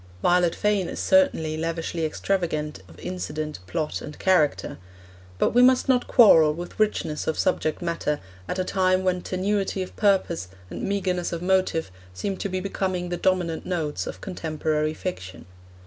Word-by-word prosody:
Violet 175 -1 +3
Fane 205 -4 +1
is - - -5
certainly 220 - +3
lavishly 165 0 -2
extravagant 155 -3 -2
of - - -16
incident, 155 - -5
plot, 155 - -2
and 150 - -8
character. 180 -6 +1 0.6
But - - +2
we 245 - +5
must 255 0 +5
not 255 -2 +2
quarrel 160 - +6
with 175 +4 -8
richness 210 -8 0
of 160 - 0
subject 155 +3 0
matter 165 -3 -1 0.3
at - - -3
a 185 - +1
time 185 0 +1
when 180 -1 +1
tenuity 195 +1 -1
of 185 - -11
purpose 195 - +1 0.2
and - - -5
meagreness 185 -3 -1
of 170 0 -4
motive 185 - +1 0.2
seem 195 - -3
to 200 - -3
be 185 0 -2
becoming 185 -2 -2
the 175 - -1
dominant 175 -3 0
notes 160 -5 -2
of - - -7
contemporary 155 -4 -2
fiction. 95 - -6
180 Hz, 160 wpm, -25 LUFS, 155-190 Hz, 0.6 s, quarrel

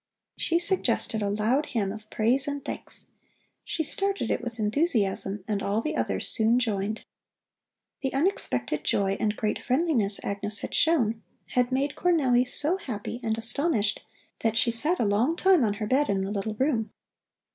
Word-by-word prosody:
She 335 - +1
suggested 345 - 0
a 200 - 0
loud 225 +8 +1
hymn 200 -5 -1
of 215 +1 -10
praise 250 +5 +1
and 285 -1 -4
thanks. - - -6 0.5
She 320 - -2
started 390 - -1
it - - 0
with 240 -1 -6
enthusiasm, 210 - 0
and 205 -2 -1
all 200 +2 0
the 305 +7 -2
others - - -1
soon 225 +1 +2
joined. 215 -3 -1 1.0
The 270 - -1
unexpected 150 - -1
joy 195 -1 +1
and 210 0 0
great 215 -1 -1
friendliness 255 - +1
Agnes 205 +1 -4
had - - -6
shown 235 -9 +2 0.3
had 250 0 +1
made 275 +2 0
Cornelli 265 -8 +2
so 305 +8 +3
happy 235 - -5
and 220 -2 -1
astonished 225 -3 0 0.4
that 225 0 0
she 235 0 +3
sat 300 +10 +4
a - - +2
long 220 +10 +2
time 370 -5 +4
on 210 -3 +1
her 210 - -3
bed 265 +6 +2
in 195 -1 +1
the 195 - -3
little 210 +1 -3
room. 240 -3 0
230 Hz, 170 wpm, -27 LUFS, 210-285 Hz, 1.0 s, sat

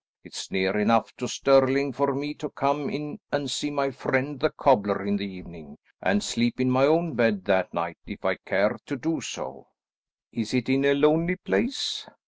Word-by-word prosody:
It's - - -8
near 95 +2 0
enough 115 +2 +2
to 125 - -4
Stirling 135 +1 +3
for 140 +1 0
me 145 +2 -3
to 150 -1 -7
come 140 +1 -1
in 150 +1 -6
and 145 -2 -1
see 145 - -2
my 140 -1 -1
friend 135 +2 -1
the 155 - +2
cobbler 100 -10 +2
in 100 0 0
the 100 0 -3
evening, 85 -5 -13 0.2
and 100 +2 +1
sleep 120 +1 0
in 130 0 +2
my 130 +2 +4
own 165 +1 +2
bed 115 -5 +1
that 95 -2 +2
night, 85 0 -4
if - - -9
I - - +1
care - - 0
to 145 - -3
do 160 +6 -2
so." - - -7 0.6
"Is 115 +1 -3
it 125 0 0
in 135 +1 +2
a 140 0 +4
lonely 160 +5 +3
place?" 240 +7 -1
130 Hz, 190 wpm, -26 LUFS, 105-145 Hz, 0.6 s, my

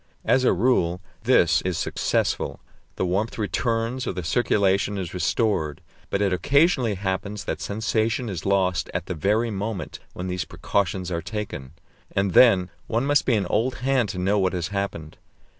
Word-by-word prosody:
As 130 - +3
a - - +4
rule 90 -4 +2 0.3
this 85 -10 +4
is 90 -3 -2
successful; - - -1 0.4
the - - -1
warmth 100 +6 -1
returns, 115 +5 -1
or - - -1
the 90 -1 -4
circulation 100 +1 +1
is 90 -3 -4
restored; 90 - 0 0.3
but 100 - 0
it 100 -2 +1
occasionally 140 - +3
happens 100 +2 -3
that - - -3
sensation 110 +3 -1
is 95 -6 -4
lost 95 -2 +1
at - - -2
the - - -3
very 105 +8 +1
moment 100 -3 -4
when 90 - -5
these 90 -1 -2
precautions 90 +2 -2
are 85 -1 -1
taken. 90 -11 -6 0.4
And 95 -1 +1
then 95 -7 +6 0.2
one 115 +4 0
must 145 0 +2
be 125 - +4
an 100 -3 0
old 120 +7 0
hand 130 -5 +2
to 90 - -5
know 100 +3 +1
what 95 -1 +1
has 90 -1 -2
happened. 100 -6 -4
100 Hz, 170 wpm, -24 LUFS, 90-115 Hz, 0.4 s, then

